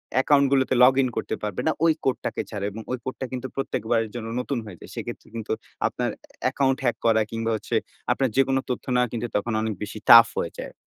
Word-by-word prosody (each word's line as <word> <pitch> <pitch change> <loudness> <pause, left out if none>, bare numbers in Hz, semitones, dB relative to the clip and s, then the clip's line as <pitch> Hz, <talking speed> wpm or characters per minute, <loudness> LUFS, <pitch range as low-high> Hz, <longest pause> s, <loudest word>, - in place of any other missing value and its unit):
Account 140 +2 +4
গুলোতে 135 -1 +3
log 130 +1 +8
in 130 - +2
করতে - - -2
পারবে 105 -3 -2
না, - - +4
ওই 160 - +5
কোড 130 - +2
টাকে - - -1
ছাড়া 100 -2 -4
এবং 110 +3 -7 0.2
কোডটা 130 0 -4
কিন্তু 130 0 -4
প্রত্যেকবারের 115 -4 -1
জন্য 115 -2 -5
নতুন 130 +1 -2
হয়ে 95 -4 -10
যায়। - - -12
সেক্ষেত্রে - - -6
কিন্তু 115 -2 -5 0.4
আপনার - - -2 0.3
অ্যাকাউন্ট 135 -1 +2
হ্যাক 120 -3 +1
করা, 110 -1 +4
কিংবা 115 0 -1
হচ্ছে 110 - -3 0.4
আপনার 135 -1 +1
যেকোনো 135 0 +3
তথ্য 125 - -3
নেওয়া 125 0 +3
কিন্তু 120 0 -2
তখন 110 +2 -2
অনেক 110 0 -1
বেশি 105 +1 -6
টাফ 115 0 +11
হয়ে 85 - -3
যায়। - - -6
120 Hz, 210 wpm, -25 LUFS, 110-130 Hz, 0.4 s, টাফ